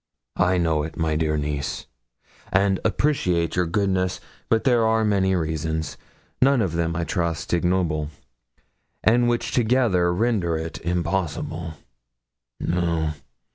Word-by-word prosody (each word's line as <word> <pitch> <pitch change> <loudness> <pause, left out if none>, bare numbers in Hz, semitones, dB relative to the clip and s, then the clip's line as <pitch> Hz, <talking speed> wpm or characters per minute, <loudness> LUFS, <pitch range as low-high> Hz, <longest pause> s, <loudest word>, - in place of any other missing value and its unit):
'I 90 +1 +3
know 80 -3 +1
it, 80 +2 -6
my 80 -2 0
dear 75 -1 0
niece, 75 -1 -3 0.7
and 95 0 +3
appreciate 90 - +1
your 90 -2 +1
goodness; 95 0 0 0.3
but 115 -1 +2
there 120 -4 +3
are 110 0 +2
many 95 -2 +2
reasons 80 -1 -2 0.5
none 135 0 +5
of 90 -4 -2
them, 85 0 -1
I 85 - -1
trust, 85 -2 -2
ignoble 85 -4 +1 0.9
and 120 +2 +4
which 120 0 -1
together 110 -8 +2
render 90 -4 +1
it 80 0 -6
impossible. 85 -1 -2 0.8
No. 85 -3 0
90 Hz, 125 wpm, -24 LUFS, 80-100 Hz, 0.9 s, none